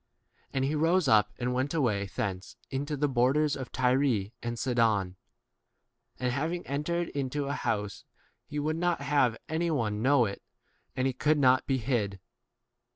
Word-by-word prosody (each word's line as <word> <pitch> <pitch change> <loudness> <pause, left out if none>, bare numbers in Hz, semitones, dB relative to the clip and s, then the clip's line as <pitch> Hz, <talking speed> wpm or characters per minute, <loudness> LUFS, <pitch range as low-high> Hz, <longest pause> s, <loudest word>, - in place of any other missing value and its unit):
24 - - -7
And 130 - +2
he 140 - 0
rose 165 +2 +2
up 105 -3 +4
and 125 0 -1
went 130 +5 -1
away 105 -10 +1
thence 95 -3 -3 0.2
into 145 +2 -2
the 145 +1 +2
borders 140 +4 +2
of 130 -2 -7
Tyre 125 -5 +1
and 120 0 -4
Sidon; 115 -7 +1 1.0
and 125 -1 0
having 160 +6 -2
entered 165 +5 -2
into 140 +1 -2
a 140 - -2
house 105 -7 -2 0.4
he 150 - -6
would 155 +2 -1
not 175 -2 0
have 135 -5 +2
any 165 +2 -1
one 110 -8 -1
know 130 0 +4
[it], 100 -1 -5 0.5
and 130 - 0
he 135 - +1
could 150 +4 +2
25 - - 0
not 130 -1 +4
be 135 - +2
hid. 110 -6 -1
130 Hz, 170 wpm, -29 LUFS, 115-150 Hz, 1.0 s, up